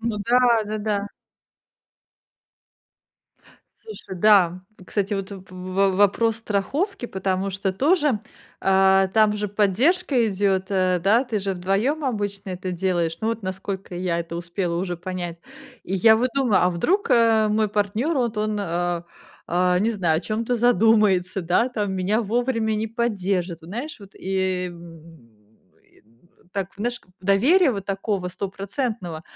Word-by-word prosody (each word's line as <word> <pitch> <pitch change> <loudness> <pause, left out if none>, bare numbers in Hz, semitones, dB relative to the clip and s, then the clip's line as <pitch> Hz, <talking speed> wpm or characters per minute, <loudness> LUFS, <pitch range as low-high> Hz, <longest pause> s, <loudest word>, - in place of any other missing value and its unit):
Ну 225 -1 -2
да, 245 +2 +4 0.3
да-да. 210 -1 -2 2.7
Слушай, 435 - -9
да. 185 -4 +5 0.3
Кстати, 205 0 -1
вот 195 0 -4
в 195 -2 -8
в 185 +1 0
вопрос 215 +3 +3
страховки, 240 - -2
потому 190 0 -2
что 195 0 -2
тоже, 285 - +2 0.4
а, 190 0 +4
там 215 +1 +3
же 210 -1 -2
поддержка 240 - +2
идет, 190 -1 0
э, 185 -2 +2
да, 225 +7 +4
ты 230 -4 -2
же 195 0 -2
2 200 - 0
обычно 205 -6 -3
это 185 0 -4
делаешь, 175 -2 -1
ну, 220 - -1
вот, 230 -1 -3
насколько 190 0 -5
я 175 -1 -1
это 170 0 -5
успела 170 0 -3
уже 175 0 -2
понять. 175 -1 -5 0.5
И 190 - -3
я 220 +4 +6
вот 245 +3 +1
думаю, 250 -10 +3
а 180 - +3
вдруг, 360 - 0
э, 225 -2 +4
мой 215 0 +1
партнёр, 210 +9 0
вот 235 -4 0
он, 210 0 -1
а, 175 -1 -2 0.7
не 215 +5 +1
знаю, 175 -8 +1
о - - -5
чём-то 230 +4 -2
задумается, 210 -5 +3
да, 180 +8 +1
там 205 -5 -2
меня 195 +5 +1
вовремя 230 0 0
не 215 +1 -1
поддержит, 195 -7 -2
вот, 160 - -12
знаешь, 245 - -5
вот, 195 -1 -13
и, 190 -1 -1
м, 165 -6 -14 0.5
и, - - -27
м, 120 - -30
так, 195 -1 -4
наш 240 +4 -3 0.2
доверия, 265 - +4
вот 200 -4 -5
такого, 195 -1 -2
стопроцентного, 195 - -4
200 Hz, 145 wpm, -23 LUFS, 185-225 Hz, 2.7 s, я